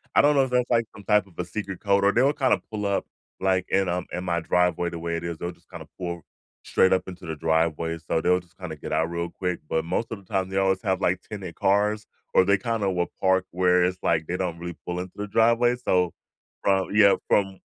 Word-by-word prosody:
I - - +7
don't 145 +1 +4
know 135 - +5
if 130 - -2
that's, 125 0 +1
like, 115 -2 +3
some 100 - -13
type 105 -1 +3
of 95 - -20
a 90 - -1
secret 95 +1 -5
code, 100 -1 +2
or 100 - +5
they 120 - +2
will 140 +3 +4
kinda 135 -4 +2
pull 105 -2 -4
up, 100 -1 0 0.3
like, 95 -1 +1
in, 95 -1 +2
um 90 +1 -1
in 90 +1 -4
my 85 -1 0
driveway 90 +1 +1
the 85 - -6
way 85 0 -2
it 85 - -4
is, 85 -1 -4
they'll 85 +2 -4
just - - -28
kinda - - -9
pull 85 -3 -5 0.4
straight 95 - +3
up 95 -1 +3
into 90 -1 -9
the 80 -1 -4
driveway, 80 +1 0
so 80 0 -1
they'll 90 +2 +3
just 90 -2 -27
kinda - - -6
get - - -8
out 80 +1 +1
real 85 0 -3
quick 90 0 -3
but 80 0 0
most 110 +7 -2
of 115 - -3
the 100 - -17
time, 95 -1 0
they 95 - -3
always 95 -1 +2
have, 95 -4 0
like, 95 -1 +1
tinted 95 -5 -7
cars, 105 +2 +1 0.3
or - - +6
they 100 +1 +3
kinda 105 -1 -1
will 90 -1 -1
park 95 0 +3
where 90 0 +3
it's, 90 0 -2
like, 80 -1 +1
they 90 - -2
don't 90 -2 -3
really 85 0 -6
pull 90 0 -3
into 90 0 -6
the 105 0 -4
driveway. 115 +3 +3
So, 90 -8 +1 0.5
from 95 -1 +2
yeah, 105 -2 +6
from 95 -2 +2
95 Hz, 255 wpm, -25 LUFS, 85-100 Hz, 0.5 s, I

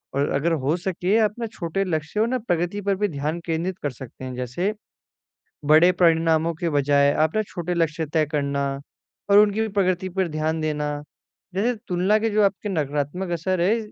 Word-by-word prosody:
और 140 +1 +1
अगर 155 +5 +1
हो 145 +5 +2
सके 185 +3 0
अपना 225 +2 0
छोटे 175 0 -2
लक्ष्य 160 +2 -2
और 235 +3 +1
प्रगति 180 -2 -1
पर 200 0 0
भी 205 +2 0
ध्यान 150 +2 -3
केंद्रित 170 +2 -2
कर 145 - -1
सकते 130 +1 -10
हैं 130 - -5
जैसे, 130 - -2 0.9
बड़े 155 +4 +6
परिणामों 165 -2 +3
के 165 +1 -2
बजाए 140 -1 +3
अपना 160 +8 +1
छोटे 175 0 -3
लक्ष्य 165 -1 0
तय 155 -1 +3
करना। 140 -1 0 0.6
और 200 - +8
उनकी 210 +1 +3
प्रकृति 190 -2 0
पर 190 0 -1
ध्यान 155 +1 -1
देना 150 -1 -2 0.5
जैसे 225 +6 +1
तुलना 185 +4 +2
के 225 +1 0
जो 210 0 +2
आपके 200 +1 0
नकारात्मक 150 +1 -2
असर 175 +2 -1
है, 200 +7 +3
170 Hz, 170 wpm, -23 LUFS, 150-195 Hz, 0.9 s, और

